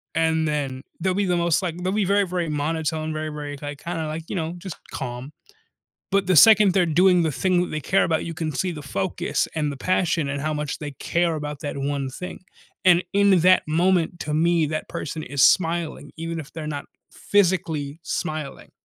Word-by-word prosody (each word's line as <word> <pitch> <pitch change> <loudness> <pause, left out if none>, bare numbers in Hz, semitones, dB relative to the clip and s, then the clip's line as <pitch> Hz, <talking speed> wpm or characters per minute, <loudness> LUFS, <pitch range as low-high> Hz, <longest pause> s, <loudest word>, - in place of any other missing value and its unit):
and 160 -1 +2
then 140 -3 -2 0.2
they'll 190 -1 0
be 200 +2 0
the 180 -2 +1
most 170 0 +2
like 175 -3 -3
they'll 185 +1 0
be 210 -2 +1
very, 200 +1 +3
very 175 -2 -2
monotone, 155 +1 -2
very, 155 0 -3
very, 145 -1 -6
like, 145 0 -6
kinda 165 -2 -3
like, 160 +1 -4
you - - -3
know, 165 -1 -2
just 185 -2 -8
calm. 125 +1 -5 0.8
But 195 -1 +2
the 185 - +3
second 210 0 +8
they're 185 -3 +3
doing 180 +2 +4
the 160 - 0
thing 180 +3 +1
that 180 - -1
they 155 -1 -3
care 195 - +2
about, 160 -1 0
you 165 - -4
can 160 -1 -3
see 180 +5 -1
the 150 -3 -7
focus 100 -9 -2
and 150 -2 0
the 140 - -7
passion 170 -2 0
and 140 0 -2
how 155 +1 -1
much 150 -1 -3
they 150 -1 -5
care 170 +4 0
about 150 -1 -5
that 145 - -4
one 140 -1 -2
thing, 180 +7 -7 0.5
and 180 0 +6
in 200 -2 +5
that 185 +2 +5
moment, 175 +1 +1
to 150 - -3
me, 165 +1 +3
that 155 +1 -3
person 155 +1 -5
is 140 -2 +1
smiling, 165 -4 +2
even 165 0 -4
if 150 - -9
they're 160 -2 -5
not 145 -2 -4 0.3
physically 170 -7 0
smiling. 155 -5 -4
160 Hz, 205 wpm, -23 LUFS, 150-180 Hz, 0.8 s, second